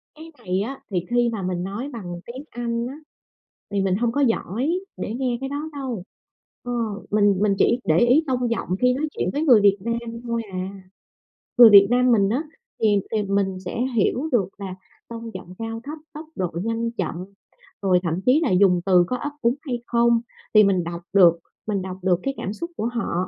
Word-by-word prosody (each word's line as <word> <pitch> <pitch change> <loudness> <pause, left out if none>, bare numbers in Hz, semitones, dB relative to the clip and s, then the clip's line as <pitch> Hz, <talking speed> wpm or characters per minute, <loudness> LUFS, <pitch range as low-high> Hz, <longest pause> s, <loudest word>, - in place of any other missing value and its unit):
Cái 325 +1 -12
này 185 +1 -2
á, 265 +5 -5
thì 180 -1 -1
khi 240 0 +2
mà 220 -4 -4
mình 180 -1 -2
nói 215 +9 -4
bằng 175 -6 -6
tiếng 260 +4 -8
Anh 235 0 -3
á, 265 - -7 0.8
thì 200 -1 0
mình 190 -1 +1
hông 235 +1 0
có 285 - 0
giỏi 240 - 0 0.3
để 220 - -4
nghe 250 -2 -1
cái 270 - -3
đó 295 +3 -4
đâu. 260 -9 -4 0.6
Ờ, 245 - -5 0.4
mình 205 -2 +3
mình 200 -2 +3
chỉ 240 +2 +3
để 160 +1 +3
ý 255 +7 +4
tông 250 -2 0
giọng 230 - -2
khi 250 0 +4
nói 305 +3 -2
chuyện - - -2
với 290 +3 -1
người 245 -9 +6
Việt 200 0 +4
Nam 230 +1 -4
thôi 235 -1 -2
à. 185 +1 -3 0.9
Người 235 -2 +10
Việt 200 -1 +9
Nam 250 0 +3
mình 200 -3 +4
á, 265 +8 0 0.4
thì 205 -2 +4
thì 215 -2 0
mình 195 -1 0
sẽ 230 - -3
hiểu 255 +8 +1
được 205 -7 +2
là 190 -2 -6 0.3
tông 230 -1 -8
giọng 185 -1 -9
cao 225 0 -5
thấp, 300 +3 -7 0.2
tốc 310 +2 -8
độ 180 -2 -2
nhanh 230 +1 -1
chậm, 190 -8 -3 0.7
rồi 185 -2 +3
thậm 170 +2 -1
chí 260 +5 +5
là 270 - +1
dùng 180 -2 +4
từ 180 -2 +5
có 250 - -2
ấp 290 +3 -4
úng 235 +2 +2
hay 245 -5 -4
không, 235 -1 +3 0.3
thì 215 0 +8
mình 190 -3 +2
đọc 170 +1 -6
được, 170 -4 +6 0.3
mình 200 -3 -1
đọc 185 0 -6
được 180 -2 +2
cái 275 - -1
cảm 195 - -4
xúc 340 +8 -6
của 220 - -2
họ. 235 -5 -2
230 Hz, 210 wpm, -23 LUFS, 195-245 Hz, 0.9 s, Người